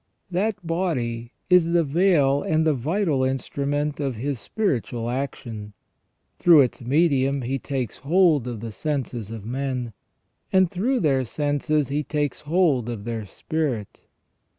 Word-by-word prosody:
That 185 0 -1
body 125 -10 -2 0.2
is 180 -2 +4
the 170 -1 +4
veil 145 -3 +3
and 160 0 +1
the 155 - +4
vital 150 - 0
instrument 140 +3 -1
of 135 -4 -1
His 130 +3 -3
spiritual 120 - -2
action; 115 -5 -5 0.7
through 165 -4 +7
its 130 -1 0
medium 140 0 +2
He 135 +3 -2
takes 130 -4 -3
hold 155 -4 +3
of 120 -4 -5
the 115 -1 -5
senses 125 -3 -3
of 110 -2 -7
men, 125 -1 -3 0.6
and 190 -2 +4
through 240 +8 0
their 135 -5 +2
senses 145 +2 0
He 145 +2 0
takes 145 -1 -2
hold 150 -7 +2
of 115 -4 -5
their 110 -2 -4
spirit. 135 -6 -3
140 Hz, 140 wpm, -24 LUFS, 120-160 Hz, 0.7 s, through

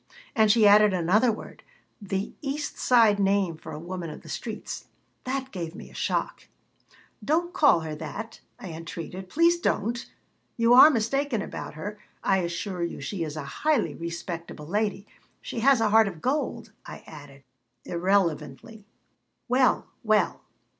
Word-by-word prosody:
And 220 -3 +4
she 225 -1 +5
added 205 -1 +6
another 200 +8 +3
word 215 - -9 0.4
the 195 0 -3
East 290 +1 -3
Side 225 -5 +4
name 195 -3 +2
for 160 0 -10
a 150 - -6
woman 175 0 -6
of 150 - -10
the - - -12
streets - - -6 0.4
that 265 +1 -3
gave 170 -2 -5
me - - -11
a - - -17
shock - - -2 0.8
"Don't 345 +4 0
call 295 - +5
her 160 -1 -5
that," 160 +9 -7 0.2
I 190 - -8
entreated. 165 +3 -7
"Please 335 - +3
don't. 235 - -1 0.5
You 230 +1 +4
are 260 +5 +10
mistaken 255 -1 0
about - - -7
her. 205 +7 -6 0.2
I 190 -1 +3
assure 175 +1 -3
you 170 - -3
she 165 +6 -4
is 155 -2 -5
a 155 - -4 0.2
highly 300 -6 +2
respectable 170 -2 -6
lady. 205 +3 -1 0.3
She - - -6
has 265 +1 +5
a 225 -1 +2
heart 220 0 +5
of 175 -5 -6
gold," 245 - -2
I - - -10
added, 140 -2 -13 0.4
irrelevantly 180 - -1 0.6
"Well, 255 +1 +3 0.2
well! 215 -2 +2
205 Hz, 155 wpm, -26 LUFS, 170-235 Hz, 0.8 s, are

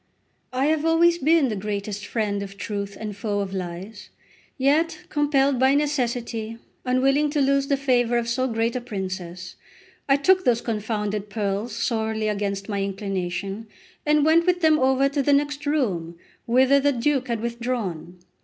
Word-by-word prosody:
I 260 +2 0
have 310 0 +1
always 335 +1 +4
been 315 -2 +3
the 215 - -2
greatest 205 0 -4
friend 205 -3 -1
of 195 0 -8
truth 200 -1 -4
and 210 -2 -5
foe 205 0 -2
of 195 -1 -3
lies: 185 +3 -6 0.5
yet 310 +5 +2
compelled 280 -5 +2
by 265 +2 +4
necessity, 240 -6 -1 0.3
unwilling 270 +4 +2
to 295 0 -1
lose 275 0 +2
the 280 - +1
favour 245 -3 +2
of 235 -1 -1
so 255 +2 0
great 230 0 -1
a 250 - -2
princess, 185 -5 -6 0.5
I 275 - +6
took 370 +7 +3
those 235 -5 +2
confounded 210 -2 -3
pearls 205 +1 -2
sorely 220 -2 -1
against 200 -1 -2
my 200 -2 -2
inclination, 195 +1 -3 0.4
and 300 0 +3
went 335 +2 +4
with 360 0 +2
them 315 -1 +4
over 265 +1 +3
to 280 +1 -1
the 280 +1 +4
other 290 0 -4
room, 180 - -1 0.3
whither 260 +3 +4
the 285 +1 +2
Duke 260 +2 0
had 235 -2 -1
withdrawn. 230 -8 -4
235 Hz, 165 wpm, -24 LUFS, 205-280 Hz, 0.5 s, I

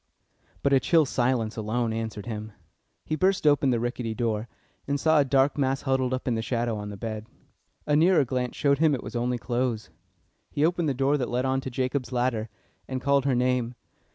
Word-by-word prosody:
But 140 - +3
a 135 - +6
chill 160 +4 +3
silence 120 -4 0
alone 110 +1 -1
answered 110 -2 -4
him. 110 -2 -6 0.5
He 155 - -1
burst 185 +2 +1
open 145 -2 +4
the 120 -2 +2
rickety 120 -1 -3
door, 115 -2 -1 0.4
and 140 0 0
saw 160 +1 +4
a - - +5
dark 135 +2 +2
mass 135 0 0
huddled 130 -2 +1
up 130 0 -3
in 125 - +2
the 110 - -1
shadow 120 -1 -1
on 105 -1 -5
the 100 - -7
bed. 110 +1 -5 0.6
A 150 - +2
nearer 165 -1 +5
glance 125 0 -2
showed 140 -1 +2
him 155 -3 +4
it 125 - -6
was - - -8
only 120 +1 0
clothes. 120 -3 -2 0.6
He 145 - +1
opened 170 -2 +1
the 135 - -1
door 135 +3 +2
that 125 - -2
led 125 +2 0
on 130 0 +1
to 130 - -5
Jacob's 130 0 -2
ladder, 120 -3 0 0.4
and 130 -1 -3
called 140 +1 +2
her 135 -3 +2
name. 125 -1 0
125 Hz, 210 wpm, -26 LUFS, 115-140 Hz, 0.6 s, a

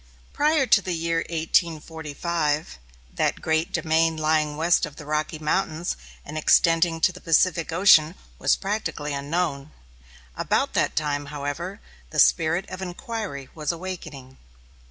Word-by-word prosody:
Prior 300 -1 +2
to 220 - +5
the 185 -2 -3
year 165 0 -1
1845, 160 - -1 0.3
that - - 0
great 160 +1 0
domain 160 0 +1
lying 155 -1 +1
west 170 +2 +3
of 145 - -13
the 150 - -10
Rocky 155 +2 -2
Mountains 160 +2 -1 0.3
and 155 +2 -5
extending 165 +1 +3
to 185 - +4
the 180 - -13
Pacific 165 0 +2
Ocean 165 -2 +5 0.2
was - - +3
practically 195 -7 -3
unknown. 140 0 -2 0.7
About - - 0
that - - +1
time, 145 -2 -1
however, 145 +7 -5 0.3
the - - -7
spirit 165 +4 +3
of 185 - -8
inquiry 190 - -5
was 150 -1 -2
awakening. 165 -7 -8
160 Hz, 135 wpm, -24 LUFS, 150-175 Hz, 0.7 s, to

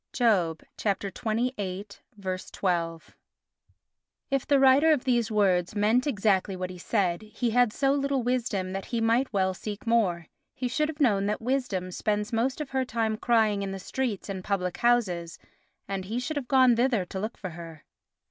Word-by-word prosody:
(Job 190 -10 +2 0.2
xxviii. 200 -1 0 1.1
12). 180 -3 -3 1.2
If 275 -1 0
the 280 -1 +4
writer 270 +4 +6
of 295 -5 +2
these 240 -3 +1
words 190 -4 +2
meant 220 +6 +2
exactly 200 -6 +1
what 185 0 -4
he 180 - -10
said, 180 -2 0
he 220 +2 -3
had 245 -1 +4
so 270 +4 +1
little 275 -2 0
wisdom 230 -7 -1
that 195 0 -4
he 235 - -2
might 230 +4 +2
well 190 -3 +1
seek 210 +4 -7
more. 200 -8 +1 0.3
He 255 - -2
should 305 +5 0
have 310 -1 -6
known 200 -7 +3
that 210 - -1
wisdom 225 -7 -1
spends 210 +4 -1
most 250 +5 0
of 300 -3 -5
her 265 -1 +1
time 225 -3 -1
crying 215 -3 +2
in 195 - -3
the - - -4
streets 235 0 -3
and 190 -2 -5
public 180 -2 -1
houses, 185 -9 +1 0.5
and 195 -1 -3
he 225 +5 -2
should 280 +5 -3
have 280 -4 -3
gone 260 -3 +5
thither 240 -6 +2
to 190 - -6
look 215 +4 -4
for 185 - -6
her. 165 -2 -10
215 Hz, 175 wpm, -27 LUFS, 190-250 Hz, 1.2 s, writer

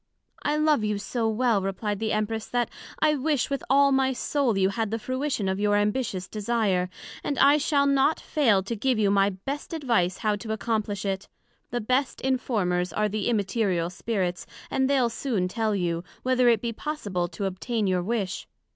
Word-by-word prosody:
I 295 +1 0
love 305 -6 +3
you 210 -1 0
so 225 +2 -1
well, 225 -2 +2
replied 195 +1 -2
the 220 -1 -1
Empress, 215 +1 -1
that 245 -1 -1 0.3
I 305 -1 +4
wish 285 -1 0
with 275 - -1
all 280 +1 +5
my 265 0 +2
soul, 255 -4 0
you 190 0 +3
had 220 +2 -2
the 225 - -1
fruition 255 -2 -2
of 190 +1 -1
your 205 0 +2
ambitious 205 -2 0
desire, 205 -4 0 0.3
and 285 - -2
I 285 +3 +6
shall 285 -1 +2
not 280 +2 +3
fail 225 -11 +2
to 230 +5 -3
give 250 +3 +1
you 205 -2 +3
my 200 0 +4
best 270 - -6
advice 230 - +1
how 215 -2 +1
to 220 +1 -4
accomplish 215 -2 -2
it; 195 -1 -3 0.4
the 240 - -2
best 255 +5 0
informers 205 -9 0
are 210 0 0
the 210 +2 -1
Immaterial 195 -5 0
Spirits, 185 -3 -2 0.2
and 265 0 +1
they'l 265 -4 +3
soon 230 -6 -1
tell 215 +2 -1
you, 170 -3 -1 0.2
Whether 255 -1 +4
it 230 -3 +3
be 235 -1 -2
possible 205 - -3
to 200 +3 -5
obtain 205 +4 -2
your 185 -2 +1
wish. 200 -1 -2
220 Hz, 185 wpm, -26 LUFS, 195-260 Hz, 0.4 s, I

